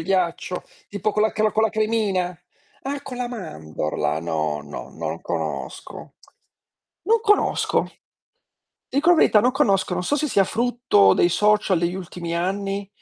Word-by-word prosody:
ghiaccio, 180 -1 -1 0.3
tipo 205 +1 -1
con 210 - 0
la 220 - +3
cla 215 0 +1
con 220 - +2
la 220 - +4
cremina. 215 -5 0 0.5
Ah, 280 +1 -3
con 250 -2 -7
la 245 - -2
mandorla, 80 - -3
no, 80 -3 -2
no, 75 0 -8
non - - -5
conosco. 70 -5 -5 0.9
Non 450 +3 +3
conosco, 420 -2 +2 1.0
dico 290 +6 +1
la 350 - +7
verità, 220 -9 +5
non 245 - +3
conosco, 200 -9 +1
non 180 - -2
so 285 - +1
se 300 +1 0
sia 195 -7 +3
frutto 235 - +3
dei 175 - +3
social 210 -1 +2
degli 170 +1 -1
ultimi 175 -2 -5
anni, 195 +3 -2
195 Hz, 150 wpm, -23 LUFS, 170-230 Hz, 1.0 s, la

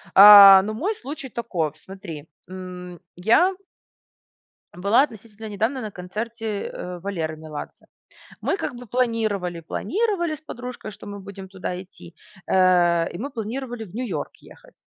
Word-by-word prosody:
А, 200 -1 +11
ну 215 +2 -3
мой 380 - -2
случай 275 -3 -8
таков. 180 - -3
Смотри, 175 -6 -10 0.2
м, 180 -1 -9 0.2
я 235 - +3 1.2
была 200 +8 +3
относительно 220 -4 -8
недавно 220 +6 -1
на 215 -2 -6
концерте, 215 +3 -5
э, 180 0 -7
Валеры 165 -4 -4
Меладзе. 155 -1 -9 0.6
Мы - - 0
как 245 - -4
бы 245 +1 -10
планировали, 215 -7 -1
планировали 345 - -1
с 305 - -17
подружкой, 250 -6 -8
что 205 - -13
мы 205 0 -7
будем 195 -1 -10
туда 185 -1 -5
идти. 180 -2 -15 0.3
Э, 175 -2 +3
и - - -7
мы 270 +8 -4
планировали 240 0 -5
в 190 -4 -13
New 250 +4 -3
York - - -4
ехать. - - -18
205 Hz, 145 wpm, -23 LUFS, 180-240 Hz, 1.2 s, А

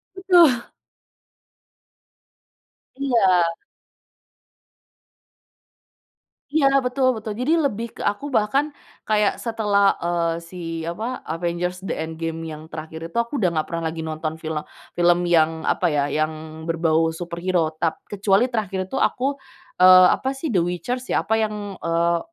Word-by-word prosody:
Betul. 345 -10 +5 2.3
Iya. 190 -11 +3 3.0
Iya, 300 -1 +3 0.2
betul 255 +1 +1
betul. 220 0 -5
Jadi 270 +6 +2
lebih 235 -3 -2
ke - - -8
aku 205 +7 -1
bahkan 270 +2 +1 0.4
kayak 210 -2 +2
setelah, 205 -4 +2
eee, 170 -1 0
si 175 +2 -12 0.3
apa, 215 +10 -4
Avengers 175 +2 -3
The 190 - -4
Endgame 165 0 -5
yang 155 +1 -9
terakhir 160 0 -7
itu 170 - -23
aku 235 +5 -4
udah 185 -5 +3
nggak 155 -1 -1
pernah 165 0 -3
lagi 160 0 -4
nonton 155 0 -4
film 160 -1 -3 0.4
film 175 0 +4
yang 160 -2 +2
apa, - - 0
ya, 150 -3 +1
yang 155 +1 -3
berbau 165 -1 +2
superhero 170 -1 -1
tap 165 -2 -1
kecuali 205 +4 +2
terakhir 200 -5 -2
itu 270 - -2
aku, 250 - 0 0.6
eee, 185 0 +9
apa, 260 - -3
sih, 270 +1 -4
The 190 - +3
Witcher, 180 +8 -2
ya, - - +1
apa 220 - -1
yang, 215 -1 -1 0.2
eee, 170 +1 +1
180 Hz, 130 wpm, -22 LUFS, 165-220 Hz, 3.0 s, eee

